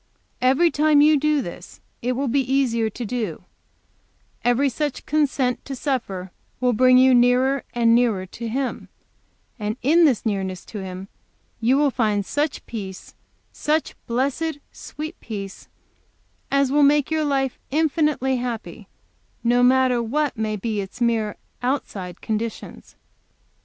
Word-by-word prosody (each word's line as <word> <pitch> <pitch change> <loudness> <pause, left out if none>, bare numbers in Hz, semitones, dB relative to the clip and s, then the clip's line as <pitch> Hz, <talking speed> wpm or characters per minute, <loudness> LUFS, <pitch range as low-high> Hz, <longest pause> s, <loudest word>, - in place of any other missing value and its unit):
Every 270 +7 +4
time 300 -1 +4
you 305 +1 +6
do 300 -1 +1
this 175 -1 -9 0.2
it 250 +2 0
will 270 +3 -1
be 270 +3 +2
easier 235 -5 +2
to 235 +3 -6
do 220 -5 -2
it; - - -16 1.0
every 245 +4 +3
such 285 +2 -3
consent 275 -4 0
to 270 - -5
suffer 215 -10 -3 0.3
will 250 -1 +2
bring 255 +3 +5
you 260 0 +6
nearer 250 +2 +3
and 230 -1 +4
nearer 230 -6 +2
to 230 +5 -7
Him; 260 +3 -3 0.7
and 210 +2 -3
in 325 +6 +5
this 260 -7 +2
nearness 190 -4 -2
to 215 - -7
Him 190 0 -7 0.5
you 240 +4 +3
will 290 -1 +3
find 210 -5 0
such 290 +5 -2
peace, 195 -5 -7 0.4
such 305 +1 -1
blessed, 280 +6 -1
sweet 310 +4 -8
peace, 200 -3 -7 0.8
as 275 -1 +2
will 295 +1 +3
make 290 +1 +4
your 315 -1 +1
life 270 -3 0
infinitely 300 -3 +1
happy, 240 -2 -5 0.6
no 240 +1 +3
matter 255 -1 +4
what 285 +6 -1
may 215 -1 -2
be 210 0 -2
its 195 +5 -9
mere 225 -3 0 0.2
outside 200 -9 -3
conditions. 225 0 -5
250 Hz, 140 wpm, -23 LUFS, 220-280 Hz, 1.0 s, you